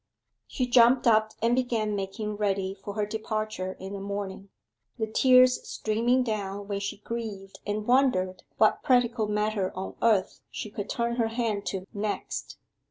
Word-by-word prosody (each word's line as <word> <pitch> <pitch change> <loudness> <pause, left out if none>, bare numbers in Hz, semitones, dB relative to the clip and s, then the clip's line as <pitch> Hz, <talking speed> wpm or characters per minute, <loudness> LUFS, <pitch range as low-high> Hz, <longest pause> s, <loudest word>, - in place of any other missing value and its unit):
She 255 - -1
jumped 245 +1 +5
up 220 -2 +4
and 230 +1 +3
began 230 -4 0
making 205 +2 -3
ready 195 -2 0
for 200 +1 -8
her 210 -1 0
departure 215 -3 -3
in 190 +1 -8
the 200 - -5
morning, 200 0 -5 0.5
the 220 - 0
tears 255 +3 +5
streaming 235 +4 +1
down 205 -3 -3
when 200 -1 -2
she 200 0 -4
grieved 205 -3 -6
and 210 +1 -2
wondered 240 -8 +2 0.2
what 215 - +4
practical 245 -4 +2
matter 210 -2 0
on 190 +1 -5
earth 215 -5 +2
she 215 - -6
could 205 -1 -5
turn 235 0 -1
her 230 -2 +2
hand 225 -3 -2
to 190 -1 -3
next. 210 0 -4
215 Hz, 160 wpm, -27 LUFS, 200-235 Hz, 0.5 s, jumped